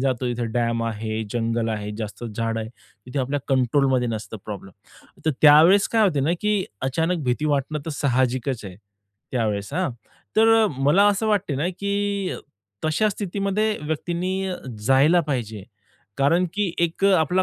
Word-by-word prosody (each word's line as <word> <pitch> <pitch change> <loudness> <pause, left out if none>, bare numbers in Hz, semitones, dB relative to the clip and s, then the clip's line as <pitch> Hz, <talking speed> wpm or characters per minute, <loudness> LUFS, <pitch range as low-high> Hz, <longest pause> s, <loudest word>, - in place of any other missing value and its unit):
जातो 130 -1 0
जिथे 120 -1 -2
डॅम 115 -1 0
आहे, 110 0 -3
जंगल 115 -1 -1
आहे, 105 -1 -3
जास्त 110 +2 -6
झाडं 115 0 -2
आहेत. 110 +1 -6 0.4
तिथे 135 +3 -4
आपल्या 135 +2 -1
कंट्रोलमध्ये 130 -1 +2
नसते 110 -1 -5
प्रॉब्लेम. 100 -3 -8 0.5
तर 160 - +3
त्यावेळेस 160 +7 +7
काय 225 -1 +4
होते 150 -9 +2
ना 155 +5 +1
की 210 -2 +1 0.2
अचानक 165 +4 0
भीती 125 +5 0
वाटणं 140 +2 -2
तर - - -2
साहजिकच 130 -3 0
आहे, 95 -2 -8 0.6
त्यावेळेस 105 -2 -1
हां. 180 -4 0 0.5
तर 225 0 +5
मला 160 +10 +4
असं 205 +2 0
वाटते 205 -8 +1
ना, 160 +6 0
की 200 0 -2 0.5
तशा 155 +8 +2
स्थितीमध्ये 205 +2 -1
व्यक्तींनी 180 +4 -2 0.4
जायला 145 +6 +5
पाहिजे. 110 -7 -3 0.6
कारण 165 +6 +3
की 205 -5 0
एक 170 +3 0
आपला 185 -1 +3
145 Hz, 150 wpm, -23 LUFS, 120-185 Hz, 0.6 s, त्यावेळेस